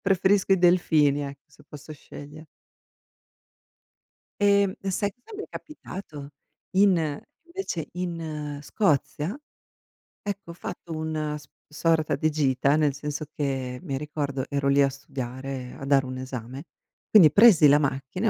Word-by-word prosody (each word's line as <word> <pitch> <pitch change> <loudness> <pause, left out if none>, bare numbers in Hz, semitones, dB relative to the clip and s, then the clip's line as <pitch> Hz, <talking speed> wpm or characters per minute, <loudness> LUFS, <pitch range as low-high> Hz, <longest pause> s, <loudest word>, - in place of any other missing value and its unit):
Preferisco 195 0 +3
i 190 - +4
delfini, 155 -5 +3
eh, 140 0 -7
se - - -21
posso 150 +1 -10
sceglie. 145 +1 -11 2.0
Ehm, 200 -1 +4
e 195 - -3
sai 200 +2 -1
cosa 325 - -13
mi 415 - -5
è - - -18
capitato? 170 - -9 0.5
In 170 -7 +3 0.2
invece 340 - -5
in 160 -5 -4
Scozia, 170 - 0 0.8
ecco 200 -3 -6
ho - - -5
fatto 175 -1 -8
una 155 -1 -3
s 145 - -16 0.2
sorta 155 -1 +1
di 155 +3 +1
gita, 140 -2 +2
nel 150 -2 +2
senso 150 +2 -5
che 130 -4 -3
mi 145 -7 -4
ricordo 140 -2 -3
ero 140 -1 -1
lì 140 +1 +5
a 140 - +4
studiare, 130 -1 -6
a 140 - -7
dare 135 -1 +4
un 130 0 -6
esame, 130 +1 -7 0.4
quindi 180 -8 +8
presi 185 -3 +7
la 145 +1 +6
macchina 140 - -2
150 Hz, 140 wpm, -26 LUFS, 140-180 Hz, 2.0 s, quindi